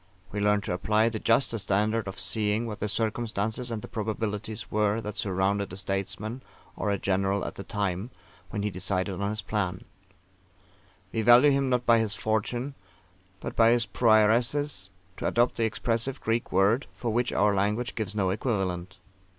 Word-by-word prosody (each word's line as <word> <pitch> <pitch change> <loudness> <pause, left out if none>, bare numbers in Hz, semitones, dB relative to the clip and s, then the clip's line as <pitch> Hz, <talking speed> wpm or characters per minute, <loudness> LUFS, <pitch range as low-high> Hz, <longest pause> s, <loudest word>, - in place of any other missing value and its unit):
We 105 - -3
learn 105 0 +3
to 100 - -3
apply 110 +5 +2
the 110 -1 -4
juster 115 0 +2
standard 105 +3 +1
of 95 - -6
seeing 110 +1 +1
what 110 -2 -5
the 105 - -1
circumstances 110 +2 -1
and 115 -2 -4
the - - -6
probabilities 110 -1 -4
were 105 +1 +1
that 105 -2 -5
surrounded 100 -1 0
a - - -6
statesman 100 +5 -3 0.3
or 105 - -2
a 100 - +1
general 95 +1 0
at - - -4
the 100 - -8
time 100 0 -2 0.4
when 100 - -3
he 105 - -1
decided 95 +1 -1
on 100 - 0
his 105 -1 -4
plan: 95 -3 -2 1.3
we 115 - 0
value 120 +6 +7
him 135 -1 +1
not 125 -1 +1
by 115 -1 +5
his 110 -2 +1
fortune, 120 +5 -1 0.7
but - - -5
by 115 0 +6
his 120 0 +3
PROAIRESIZ, 115 +1 +3 0.3
to - - -2
adopt 120 +1 +2
the 115 - +2
expressive 115 +3 -1
Greek 115 +1 -1
word, 105 +7 +3
for 115 -3 -3
which 120 +1 +1
our 105 0 +3
language 105 +5 0
gives 105 -3 -4
no 95 -3 +1
equivalent. 95 -4 -2
105 Hz, 175 wpm, -27 LUFS, 100-115 Hz, 1.3 s, value